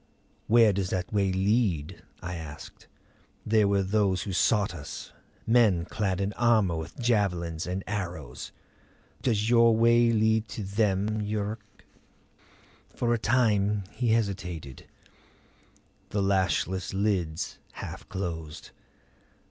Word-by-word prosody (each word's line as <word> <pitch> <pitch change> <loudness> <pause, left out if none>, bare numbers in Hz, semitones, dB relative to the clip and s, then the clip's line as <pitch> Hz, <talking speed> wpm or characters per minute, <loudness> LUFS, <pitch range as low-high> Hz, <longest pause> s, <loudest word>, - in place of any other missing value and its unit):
"Where 115 -2 +6
does 95 -1 -1
that 90 0 -3
way 100 -2 +2
lead?" 95 -5 0 0.2
I 90 0 -4
asked. 80 -3 -10 0.6
"There 110 -1 +3
were 100 -1 +2
those 95 -2 +1
who 100 - -4
sought 105 +1 +2
us; 75 -4 -8 0.3
men 110 -8 +4
clad 95 -2 -2
in 100 +1 -1
armor 110 -7 +3
with 80 0 -6
javelins 90 -9 0
and 95 +2 -3
arrows. 90 -11 -5 0.7
Does 110 -4 +1
your 115 -1 +5
way 115 +1 +5
lead 110 0 +2
to 105 +1 -6
them, 100 +1 0
Yuruk?" 105 +1 -5 1.1
For 120 -1 +1
a 120 - 0
time 105 -4 +2
he 120 +1 -2
hesitated, 90 - -2 1.2
the 100 -1 -1
lashless 95 -1 0
lids 95 -6 -1
half - - -8
closed. 80 -4 -5
100 Hz, 115 wpm, -27 LUFS, 90-110 Hz, 1.2 s, Where